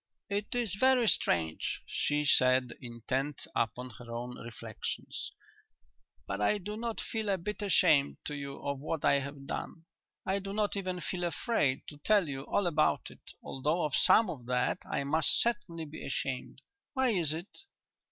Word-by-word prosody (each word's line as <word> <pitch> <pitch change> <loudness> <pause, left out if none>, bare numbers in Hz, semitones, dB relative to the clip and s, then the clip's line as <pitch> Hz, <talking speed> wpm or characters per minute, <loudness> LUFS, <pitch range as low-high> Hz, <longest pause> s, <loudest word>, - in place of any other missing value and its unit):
"It 205 +4 -1
is 235 -6 +1
very 260 -2 +5
strange," 80 - +1
she 150 0 0
said, 130 -3 +4
intent 130 +4 -3
upon 125 +2 -1
her 120 -1 -9
own 120 +1 -4
reflections, 115 -2 -5 0.9
"but 95 +6 -3
I 155 - +3
do 205 +2 -5
not 230 0 -3
feel 220 -2 -2
a 195 - +2
bit 210 +5 -4
ashamed 165 -8 +4
to 150 - -2
you 140 -1 -5
of 140 -1 -1
what 155 +2 -2
I 140 - +5
have 140 0 -7
done. 165 +3 -5 0.4
I 190 +1 +1
do 195 0 -5
not 210 0 0
even 185 -2 -3
feel 180 0 -3
afraid 170 - +1
to 145 - -10
tell 205 +1 +3
you 135 -2 -4
all 200 - +1
about 155 -3 +2
it, - - -16 0.2
although 150 +6 0
of 150 -3 -1
some 225 - +6
of 130 -9 -6
that 125 0 +1
I - - 0
must 155 +3 +4
certainly 200 -9 0
be 150 +1 -9
ashamed. 135 -1 -3 0.3
Why 260 -2 +3
is 170 -8 +2
it?" 165 +5 -6
155 Hz, 170 wpm, -31 LUFS, 135-200 Hz, 0.9 s, some